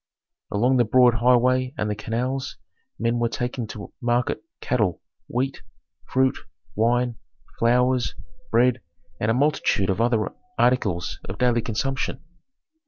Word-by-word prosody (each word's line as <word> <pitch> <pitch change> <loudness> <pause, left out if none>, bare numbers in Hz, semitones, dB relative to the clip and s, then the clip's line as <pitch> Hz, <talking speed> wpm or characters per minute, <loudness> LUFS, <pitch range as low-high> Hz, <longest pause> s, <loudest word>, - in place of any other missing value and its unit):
Along 125 +6 +2
the 120 - +5
broad 125 +2 +5
highway 125 +3 +3
and 105 - -1
the 105 - 0
canals 125 +6 -3 0.4
men 115 +1 0
were 120 0 +1
taking 120 0 -3
to 105 -1 -9
market 120 +5 0 0.2
cattle, 105 - 0 0.3
wheat, 130 +3 -2 0.5
fruit, 130 0 +2 0.4
wine, 120 +1 +1 0.4
flowers, 125 +1 +2 0.3
bread, 125 +2 +3 0.4
and 105 - 0
a 110 - +3
multitude 130 -8 +2
of 95 - -1
other 115 -2 +1 0.3
articles 105 -9 +1
of 95 +1 -6
daily 120 -1 +2
consumption. 130 +5 -2
120 Hz, 125 wpm, -24 LUFS, 115-130 Hz, 0.5 s, the